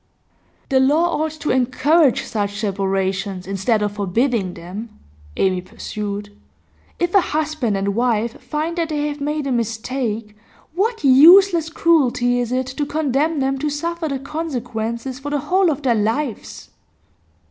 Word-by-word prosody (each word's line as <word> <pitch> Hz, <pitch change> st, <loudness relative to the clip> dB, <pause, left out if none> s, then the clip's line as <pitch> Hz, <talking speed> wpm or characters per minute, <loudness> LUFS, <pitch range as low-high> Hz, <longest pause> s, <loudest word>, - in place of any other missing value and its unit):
'The 265 Hz, -2 st, +3 dB
law 305 Hz, +5 st, +2 dB
ought 315 Hz, -, 0 dB
to 305 Hz, -1 st, -3 dB
encourage 265 Hz, +3 st, +3 dB
such 205 Hz, -2 st, -3 dB
separations, 195 Hz, -2 st, -2 dB
instead 195 Hz, +3 st, 0 dB
of 205 Hz, -, -1 dB
forbidding 205 Hz, 0 st, -1 dB
them,' 200 Hz, +6 st, -8 dB, 0.4 s
Amy 185 Hz, -1 st, +1 dB
pursued. 205 Hz, +2 st, -6 dB, 0.6 s
'If 350 Hz, 0 st, -1 dB
a 395 Hz, -, +6 dB
husband 300 Hz, -, -1 dB
and 200 Hz, +1 st, -1 dB
wife 235 Hz, 0 st, 0 dB
find 325 Hz, +3 st, -3 dB
that 330 Hz, -1 st, -1 dB
they 295 Hz, -1 st, -1 dB
have 290 Hz, 0 st, -7 dB
made 300 Hz, 0 st, -2 dB
a 275 Hz, -, -1 dB
mistake, 230 Hz, -2 st, -3 dB, 0.4 s
what 435 Hz, +3 st, -1 dB
useless 330 Hz, +5 st, +7 dB
cruelty 250 Hz, -8 st, +2 dB
it 240 Hz, -1 st, -3 dB
is 255 Hz, +1 st, -1 dB
to 290 Hz, -, -2 dB
condemn 300 Hz, 0 st, 0 dB
them 270 Hz, 0 st, 0 dB
to 300 Hz, -, -1 dB
suffer 335 Hz, +3 st, -3 dB
the 275 Hz, -2 st, -2 dB
consequences 255 Hz, -4 st, -4 dB
for 285 Hz, +2 st, -5 dB
the 290 Hz, -, 0 dB
whole 370 Hz, +5 st, +2 dB
of 295 Hz, -2 st, -2 dB
their 250 Hz, -3 st, +3 dB
lives! 225 Hz, +3 st, -3 dB
260 Hz, 145 wpm, -20 LUFS, 215-305 Hz, 0.6 s, useless